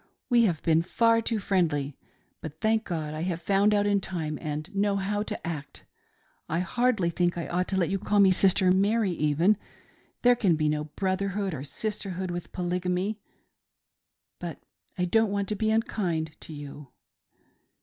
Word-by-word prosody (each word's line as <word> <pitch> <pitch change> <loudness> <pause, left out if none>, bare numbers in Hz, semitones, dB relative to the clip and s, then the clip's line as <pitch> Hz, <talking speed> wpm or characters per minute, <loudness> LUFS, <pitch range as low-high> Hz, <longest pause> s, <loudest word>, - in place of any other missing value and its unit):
We 235 -1 +6
have 170 -7 -1
been 160 0 +4
far 230 +6 +3
too 225 0 -1
friendly, 160 -8 0 0.5
but, 155 0 -8
thank 220 0 +1
God, 155 -4 -3
I 155 - -4
have 170 -1 -2
found 200 +4 +3
out 205 -1 +2
in 205 -1 +2
time, 160 -5 -4
and 155 +4 -5
know 200 0 +2
how 200 +1 -1
to 210 - -5
act. 150 -4 -6 0.6
I 165 - 0
hardly 215 -2 +1
think 175 +1 0
I 170 - -3
ought 180 +1 -1
to 190 - -1
let 175 -3 +1
you 195 - 0
call 205 +1 +1
me 195 -1 +7
Sister 185 0 +4
Mary 200 +2 +2
even; 165 +5 +2 0.3
— - - -35
there 245 0 +6
can 195 -8 +2
be 155 -1 +1
no 150 0 -1
brotherhood 195 +3 -2
or 135 -3 -5
sisterhood 190 +2 -4
with 175 0 -6
Poly 180 0 -2
gamy; 185 +4 -1 1.2
but - - -6 0.4
I 180 - +1
don't 220 +4 +3
want 200 0 -1
to 210 - 0
be 220 +1 0
unkind 185 -8 0
to - - -10
you." 145 -1 -9
185 Hz, 180 wpm, -27 LUFS, 165-205 Hz, 1.2 s, me